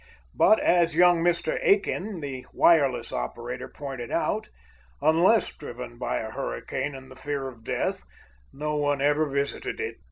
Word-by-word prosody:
But, 215 - +5
as 170 -2 +3
young 175 -1 +5
Mr. 170 0 +1
Aiken, 200 -2 +1
the 135 -3 -6
wireless 145 -7 +3
operator, - - -4
pointed 135 -4 -7
out, - - -1 0.5
unless 170 +9 +3
driven 120 -4 -8
by - - -1
a 110 0 -4
hurricane 130 - -4
and 130 0 -11
the - - -11
fear 140 0 -3
of 120 -4 -11
death, - - -2 0.5
no 150 +1 -3
one 145 -1 +1
ever 145 +2 +2
visited 140 - -2
it. 450 0 -4
145 Hz, 150 wpm, -26 LUFS, 130-170 Hz, 0.5 s, But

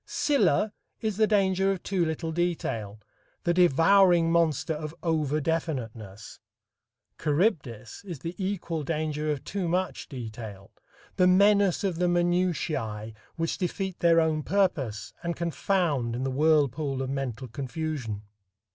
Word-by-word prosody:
Scylla 215 - +2 0.3
is 215 -3 -2
the 215 -1 +4
danger 195 -2 +2
of 190 -2 -4
too 190 -3 0
little 160 0 -2
detail, 135 - -2 0.4
the 175 - +2
devouring 175 +1 +5
monster 165 -2 +2
of 155 +1 -6
over 155 -3 +1
definiteness; 120 - -4 0.8
Charybdis 145 - -1
is 180 -5 -6
the 165 +6 -5
equal 175 -4 -2
danger 155 0 -2
of 145 -3 -3
too 195 -3 -3
much 180 +2 -2
detail, 110 -6 -8 0.5
the 180 - +5
menace 200 +1 +4
of 185 -4 -1
the 180 +1 +2
minutiæ 170 -11 0 0.2
which 165 0 -2
defeat 190 0 -3
their 170 -1 +5
own 160 -1 +1
purpose, 150 - 0
and 170 -1 -2
confound 170 -8 0
in 125 - -3
the 135 - -1
whirlpool 145 -1 +2
of 130 - -4
mental 130 -2 -3
confusion. 130 -4 -4
160 Hz, 130 wpm, -27 LUFS, 135-180 Hz, 0.8 s, devouring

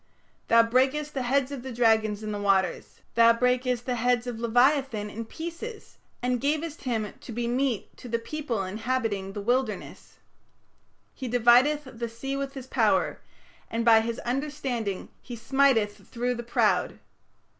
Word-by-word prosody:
" - - -39
"Thou 230 0 +6
brakest 265 +6 +1
the 270 - -2
heads 265 +2 +1
of 275 -3 -5
the 260 +1 -7
dragons 220 -3 +2
in 215 - -3
the 205 -1 -4
waters; 195 -2 0
thou 230 0 +6
brakest 250 0 0
the 250 - -1
heads 245 0 +1
of 240 -2 -5
leviathan 245 -2 +2
in 230 +2 -6
pieces, 340 - -8 0.3
and 250 -1 0
gavest 305 +1 -2
him 220 -5 -2
to - - -9
be 235 +1 -2
meat 250 -2 -1
to 245 - -10
the 230 - +1
people 235 -3 -3
inhabiting 210 -1 -2
the 205 - -5
wilderness"; 250 +5 -2 1.0
"He 260 - -6
divideth 245 +5 +4
the 235 -2 -6
sea 270 +4 -5
with 275 0 -4
his 265 -2 -7
power, - - +1 0.5
and 230 +1 -2
by 225 -1 +7
his 230 +1 -3
understanding 255 -6 -3
he 245 - -8
smiteth 235 -3 +2
through 245 +1 -1
the 240 - -5
proud 240 0 +1
(Rahab). - - -22
245 Hz, 165 wpm, -27 LUFS, 225-270 Hz, 1.0 s, by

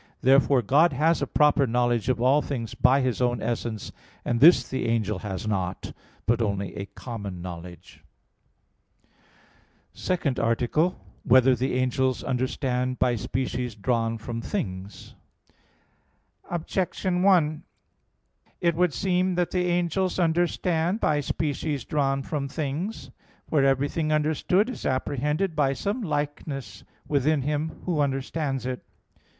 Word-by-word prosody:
Therefore 135 -1 +4
God 150 +8 +4
has 160 +5 +2
a - - 0
proper 145 -2 +3
knowledge 120 0 +1
of 125 -2 +1
all 130 +5 +4
things 120 -8 -4
by 130 +2 +4
His 130 -1 -1
own 120 -1 +1
essence: 115 -2 -3 0.3
and 120 -1 0
this 145 -3 +7
the 130 -2 -2
angel 110 -4 0
has 100 +1 -5
not, 95 -3 -3 0.3
but 120 +1 +2
only 100 -4 -2
a 100 - -5
common 100 -7 -7
knowledge. 85 0 -9 1.0
_______________________ - - -39 0.9
SECOND 165 -8 -1
ARTICLE 120 +7 +2
[I, - - -1
Q. - - -15
55, - - -26
Art. - - -26
2] - - -10
Whether 130 +1 +6
the 130 +2 -1
Angels 130 -1 0
Understand 125 0 -1
by 125 -1 +2
Species 125 +1 -3
Drawn 115 +1 0
from 115 +1 -5
Things? 95 -2 -5 1.4
Objection 180 +1 -1
1: 170 -6 +3 1.0
It 170 -1 +2
would 175 -2 +1
seem 185 -1 +1
that 175 -1 0
the 180 -1 0
angels 175 +1 0
understand 175 +1 +1
by 150 -7 +2
species 145 0 -2
drawn 135 -2 0
from 140 -2 -3
things. 150 - -4 0.4
For 150 -3 +2
everything 145 +3 +1
understood 155 +7 +2
is 255 - -6
apprehended 150 +7 -1
by 140 -2 +2
some 200 - -2
likeness 145 - -4 0.2
within 145 0 +1
him 150 +2 -3
who 170 -4 0
understands 135 0 -1
it. 125 -1 -4
135 Hz, 140 wpm, -26 LUFS, 120-160 Hz, 1.4 s, this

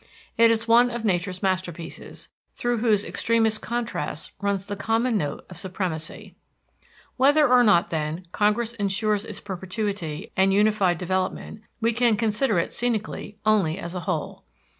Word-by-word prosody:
It 230 0 +6
is 225 0 +1
one 240 +2 +6
of 240 -1 -4
Nature's 185 -1 -1
masterpieces, 185 -3 -4 0.3
through 240 -1 0
whose 215 -3 +2
extremest 225 -2 +1
contrasts 230 -10 -4
runs 200 -1 -1
the 205 - -4
common 225 +4 0
note 145 -8 -2
of 180 - -11
supremacy. 180 -4 -5 0.8
Whether 290 +3 +5
or 250 -1 +6
not, 205 -3 +4
then, 160 +2 -3
Congress 215 +4 +1
insures 205 -1 0
its - - -6
perpetuity 190 -4 -4
and 190 0 +3
unified 200 -3 +3
development, 185 +4 -3 0.2
we 230 +1 +2
can 235 -2 +3
consider 220 0 +1
it 170 - -1
scenically 215 -3 -2
only 195 -7 +2
as 170 -3 -6
a 180 - -3
whole. 160 -5 -3
205 Hz, 145 wpm, -24 LUFS, 185-230 Hz, 0.8 s, It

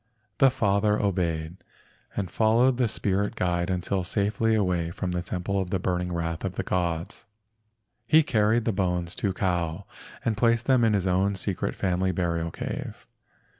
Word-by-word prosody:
The 135 - +7
father 105 -4 +1
obeyed, 85 -4 -1 0.6
and 95 -4 -3
followed 115 +5 +3
the 125 -2 +2
spirit 100 -1 -1
guide 85 -1 0
until 95 +1 -1
safely 105 +4 +1
away 90 -5 0
from 90 +2 -4
the 90 0 -1
temple 95 +2 -2
of 90 - -4
the 95 - 0
burning 90 0 -1
wrath 85 -1 -3
of 95 -1 -3
the - - -2
gods. 85 -2 -2 0.8
He 160 +4 +6
carried 110 -3 +2
the 115 - +1
bones 90 -3 -1
to 100 - -1
Kau 90 -1 -1 0.4
and 110 - +1
placed 115 +1 +2
them 130 -3 +4
in 110 -2 +3
his 100 -3 +1
own 95 +2 +2
secret 95 0 -2
family 95 0 0
burial 85 -2 -1
cave. - - -6
95 Hz, 165 wpm, -26 LUFS, 90-105 Hz, 0.8 s, The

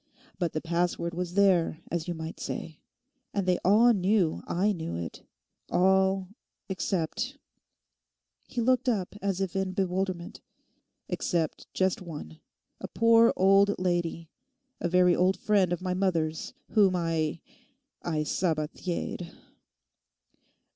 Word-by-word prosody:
But 175 -4 -1
the 155 - -2
password 170 0 -1
was 175 +1 -4
there, 190 -6 +3
as 170 0 -2
you 175 - -2
might 160 0 -7
say; 160 -2 -5 0.6
and 200 -2 0
they 180 -1 +2
all 225 +5 +6
knew 190 -4 +1
I 195 +5 +1
knew 160 - -4
it, 85 -1 -6 0.5
all—except'—he 190 - 0 1.3
looked 255 +1 +2
up 200 -6 -1
as 195 -1 -1
if 190 -2 -2
in 190 -1 -1
bewilderment—'except 180 -2 -4
just 190 0 +1
one, 150 - -8 0.4
a - - -5
poor 230 0 +5
old 195 +2 +4
lady, 175 -3 -1 0.5
a 175 - -1
very 180 0 +4
old 185 +1 +2
friend 195 -3 +2
of 175 0 -2
my 185 -1 -1
mother's, 170 -4 -1 0.2
whom 200 -4 +4
I—I 165 - -4
Sabathiered! 170 +2 -2
180 Hz, 115 wpm, -28 LUFS, 170-195 Hz, 1.3 s, all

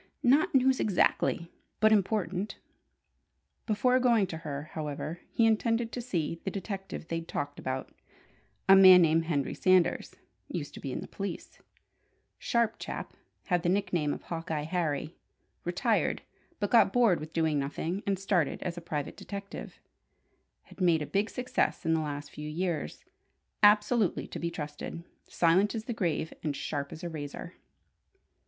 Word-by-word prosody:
"Not 275 +4 +4
news 265 0 +4
exactly, 175 -3 +1 0.3
but 215 0 +5
important." 200 -2 0 1.1
Before 250 +4 +3
going 235 -5 +4
to - - -3
her, 150 -1 -6
however, 155 +2 -4
he 230 - +3
intended 230 +1 +1
to 245 - -4
see 170 -8 -2
the - - -1
detective 195 -3 -6
they'd 165 0 -3
talked 145 0 -4
about: 130 0 -4 0.7
a 195 - +9
man 185 -2 +9
named 165 0 +3
Henry 145 -5 -1
Sanders 185 -2 +2 0.3
used - - -5
to - - -9
be - - -5
in - - -4
the - - -8
police - - -6 0.8
sharp 235 -2 +1
chap; - - -6 0.3
had 180 -3 +1
the 175 - 0
nickname 180 -6 +1
of - - -5
"Hawkeye 165 -3 -3
Harry"; 155 -2 -2 0.5
retired, - - 0 0.4
but 205 - -1
got 230 -4 +6
bored 230 -7 +4
with 155 +1 -8
doing 160 -3 +1
nothing, 160 +7 -3
and 195 -1 +1
started 180 -5 0
as 175 -1 -4
a - - -14
private 150 -3 -4
detective; 200 -1 -8 0.9
had - - -14
made 165 -4 +3
a - - -4
big 200 +7 0
success 250 -6 -1
in 165 - +3
the 160 - +2
last 145 -1 -5
few 150 0 -7
years; 165 - -3 0.6
absolutely 210 0 +4
to - - -6
be 170 - -1
trusted: 150 +1 -6 0.2
silent 185 +6 +3
as 220 - -3
the 240 - -3
grave 165 -6 -1
and 150 -2 -2
sharp 140 0 -4
as 160 - -9
a 175 - -3
razor. 155 +2 -7
175 Hz, 155 wpm, -30 LUFS, 155-205 Hz, 1.1 s, a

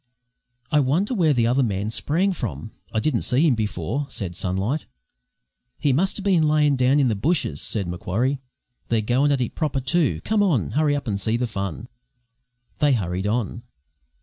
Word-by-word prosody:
"I 150 - +4
wonder 160 - +1
where 170 -9 +3
the 120 -5 +2
other 125 +4 +2
man 105 -3 -1
sprang 175 +11 +1
from? 110 -9 -5 0.2
I 110 - 0
didn't 125 -1 0
see 135 +6 +2
him 150 - +4
before," 110 - -2
said 90 -5 -3
Sunlight. 95 - -2 0.9
"He 140 - +1
muster 190 +7 0
bin 190 -5 +3
layin' 150 -2 +3
down 130 +3 +3
in 135 - +3
the 110 - +1
bushes," 130 - 0
said 100 -5 -1
Macquarie. 110 +10 -1 0.5
"They're 115 -2 +2
goin' 130 +7 +2
at 135 -2 +1
it 120 - -2
proper, 150 -4 -1
too. 135 - +1
Come 215 -1 +1
on! 140 - +1
Hurry 150 0 +2
up 140 - -4
and 100 -2 -2
see 110 +4 +1
the 125 - 0
fun!" 100 -1 -5 0.9
They 145 -2 +4
hurried 95 -3 -1
on. 115 +1 -2
125 Hz, 175 wpm, -23 LUFS, 105-150 Hz, 0.9 s, I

